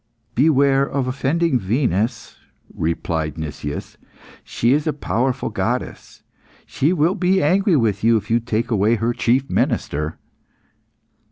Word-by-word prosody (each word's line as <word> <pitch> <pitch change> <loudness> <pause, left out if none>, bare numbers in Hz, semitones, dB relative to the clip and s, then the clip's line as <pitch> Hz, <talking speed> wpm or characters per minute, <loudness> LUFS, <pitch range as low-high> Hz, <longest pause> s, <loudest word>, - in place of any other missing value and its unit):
"Beware 140 0 +3
of 140 -1 -2
offending 140 +3 0
Venus," 110 - -1 0.4
replied 80 -1 -2
Nicias. 75 -2 -6 0.4
"She 120 +3 +1
is 150 +2 0
a 155 - +1
powerful 130 -2 -1
goddess, 110 +5 -4 0.4
she 145 +5 0
will 175 0 +2
be 185 +1 +2
angry 185 +4 +3
with 110 -6 +1
you 115 0 +4
if 105 +1 -6
you 115 - +4
take 115 +1 -2
away 110 +1 +3
her 115 +2 -1
chief 130 +3 +1
minister." 75 +2 -1
120 Hz, 125 wpm, -20 LUFS, 105-140 Hz, 0.4 s, you